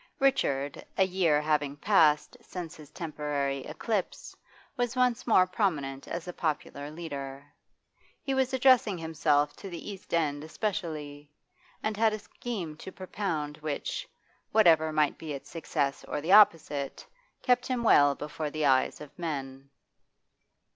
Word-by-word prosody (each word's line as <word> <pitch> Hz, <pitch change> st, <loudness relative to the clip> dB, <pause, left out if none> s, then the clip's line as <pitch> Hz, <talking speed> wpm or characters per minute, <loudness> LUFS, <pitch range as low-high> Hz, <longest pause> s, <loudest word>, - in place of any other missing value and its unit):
Richard, 145 Hz, -, +1 dB
a 190 Hz, -, +5 dB
year 180 Hz, -5 st, +2 dB
having 150 Hz, -2 st, 0 dB
passed 160 Hz, -, +3 dB
since 180 Hz, -7 st, -7 dB
his 150 Hz, -2 st, -13 dB
temporary 150 Hz, -4 st, -2 dB
eclipse, 215 Hz, -5 st, -3 dB, 0.4 s
was 245 Hz, 0 st, -1 dB
once 250 Hz, -1 st, +1 dB
more 185 Hz, -5 st, +6 dB
prominent 155 Hz, -9 st, -1 dB
as 170 Hz, +1 st, -5 dB
a 180 Hz, -, -5 dB
popular 150 Hz, -3 st, -3 dB
leader. 140 Hz, -4 st, -7 dB, 0.8 s
He 270 Hz, -, -1 dB
was 265 Hz, 0 st, +1 dB
addressing 255 Hz, -6 st, +4 dB
himself 150 Hz, -3 st, +1 dB
to 195 Hz, -, -8 dB
the 175 Hz, +3 st, -6 dB
East 195 Hz, -, -11 dB
End 150 Hz, -3 st, 0 dB
especially, 155 Hz, -6 st, -4 dB, 0.5 s
and 215 Hz, 0 st, -1 dB
had 220 Hz, 0 st, +3 dB
a -, -, -1 dB
scheme 200 Hz, -6 st, -6 dB
to 190 Hz, -, -9 dB
propound 170 Hz, -6 st, -4 dB
which, 155 Hz, -, -4 dB, 0.4 s
whatever 165 Hz, -7 st, +5 dB
might 155 Hz, -1 st, +1 dB
be 155 Hz, -2 st, -5 dB
its 140 Hz, -, -8 dB
success 140 Hz, -4 st, -2 dB
or -, -, -2 dB
the 160 Hz, +5 st, -2 dB
opposite, 165 Hz, -9 st, +4 dB, 0.4 s
kept 245 Hz, 0 st, +2 dB
him 250 Hz, -2 st, -1 dB
well 145 Hz, -10 st, +6 dB
before 150 Hz, +1 st, -4 dB
the 155 Hz, 0 st, -1 dB
eyes 130 Hz, +1 st, +2 dB
of 150 Hz, -2 st, -9 dB
men. 135 Hz, -4 st, -5 dB
160 Hz, 140 wpm, -29 LUFS, 145-200 Hz, 0.8 s, more